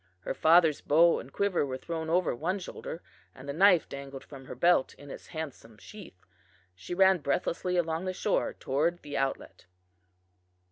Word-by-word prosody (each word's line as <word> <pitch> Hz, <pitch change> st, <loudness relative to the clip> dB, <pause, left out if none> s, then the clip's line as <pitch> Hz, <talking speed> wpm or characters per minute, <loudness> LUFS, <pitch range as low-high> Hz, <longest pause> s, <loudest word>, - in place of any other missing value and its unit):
Her -, -, -3 dB
father's 160 Hz, -2 st, +4 dB
bow 165 Hz, +3 st, +4 dB
and 130 Hz, -, -11 dB
quiver 200 Hz, -2 st, 0 dB
were 130 Hz, -2 st, -4 dB
thrown 160 Hz, +2 st, -5 dB
over 180 Hz, +2 st, +1 dB
one 175 Hz, +9 st, -2 dB
shoulder, 175 Hz, -2 st, -8 dB, 0.3 s
and 130 Hz, +1 st, -12 dB
the 140 Hz, -, -3 dB
knife 180 Hz, 0 st, +4 dB
dangled 140 Hz, -1 st, -8 dB
from 135 Hz, -2 st, -12 dB
her -, -, -8 dB
belt 170 Hz, +1 st, +2 dB
in 145 Hz, -1 st, -12 dB
its -, -, -10 dB
handsome 140 Hz, -8 st, -8 dB
sheath. 155 Hz, -, -13 dB, 0.5 s
She 90 Hz, -, -7 dB
ran 190 Hz, 0 st, +5 dB
breathlessly 180 Hz, +4 st, -1 dB
along 165 Hz, +1 st, -1 dB
the 185 Hz, -, -1 dB
shore 195 Hz, +2 st, -1 dB
toward 160 Hz, +6 st, -1 dB
the 145 Hz, -1 st, -7 dB
outlet. 135 Hz, -9 st, -3 dB
160 Hz, 170 wpm, -29 LUFS, 140-175 Hz, 0.5 s, ran